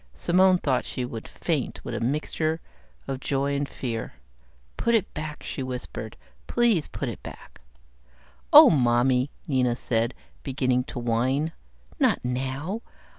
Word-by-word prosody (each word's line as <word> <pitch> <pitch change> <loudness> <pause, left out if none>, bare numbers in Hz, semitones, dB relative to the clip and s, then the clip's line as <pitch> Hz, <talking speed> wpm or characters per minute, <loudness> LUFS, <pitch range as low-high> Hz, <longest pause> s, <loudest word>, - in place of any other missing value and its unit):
Simone 185 - +4
thought 135 -7 0
she 125 - -4
would 115 -2 -7
faint - - -3
with - - -4
a - - -2
mixture 155 +5 -1 0.5
of 135 -1 -3
joy 140 +1 0
and 140 0 -1
fear. 115 -4 -4 0.6
"Put 235 0 +2
it 220 - 0
back," 155 0 -6
she - - -5
whispered. 125 -4 -6 0.3
"Please 235 -10 +2
put 140 - -4
it 115 - -5
back." - - -11 0.9
"Oh - - +11
Mommy," 125 0 +3 0.2
Nina 125 -4 +2
said, 115 0 -1 0.3
beginning 130 -2 0
to - - -8
whine. 125 +6 +1 0.5
"Not 255 -6 +4
now. 135 - -2
135 Hz, 135 wpm, -26 LUFS, 125-155 Hz, 0.9 s, Oh